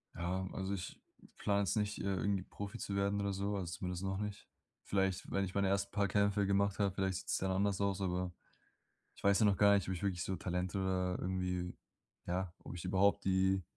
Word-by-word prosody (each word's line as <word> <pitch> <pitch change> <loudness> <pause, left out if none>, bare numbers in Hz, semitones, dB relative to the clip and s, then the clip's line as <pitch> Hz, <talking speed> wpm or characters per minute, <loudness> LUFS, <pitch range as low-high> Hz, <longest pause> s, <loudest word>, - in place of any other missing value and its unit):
Ja, 90 +2 -1
also 95 +1 -2
ich 90 -2 -5 0.4
plane 100 -1 +2
jetzt 95 - +1
nicht, 105 0 0
äh, - - -3
irgendwie 100 0 0
Profi 100 +4 -7
zu 100 -3 -3
werden 100 +1 +1
oder 100 -1 0
so, 100 +2 -1
also 90 -3 -3
zumindest 90 +1 -4
noch 95 0 -1
nicht. 105 -1 -5 0.4
Vielleicht, 95 -1 0
wenn 100 0 +1
ich 95 - -7
meine 100 -1 +2
ersten 100 +1 +1
paar 100 -1 +2
Kämpfe 100 -1 +2
gemacht 100 0 +2
habe, 100 -2 +2
vielleicht 95 -2 0
sieht's - - -1
dann 95 0 0
anders 100 +1 +1
aus, 100 -1 0
aber 90 -1 -1 0.8
ich - - -16
weiß 100 +1 +5
ja 110 - +6
noch 100 -2 +4
gar 100 0 +6
nicht, 100 -3 +1
ob 95 - 0
ich 85 - -6
wirklich 90 -4 0
so 95 - -2
Talent 90 +1 -2
oder 95 -1 0
irgendwie 90 -1 -2 0.5
ja, 90 0 -1
ob - - -9
ich 85 - -7
überhaupt 95 +2 +3
die 95 0 +3
95 Hz, 220 wpm, -35 LUFS, 90-100 Hz, 0.8 s, ja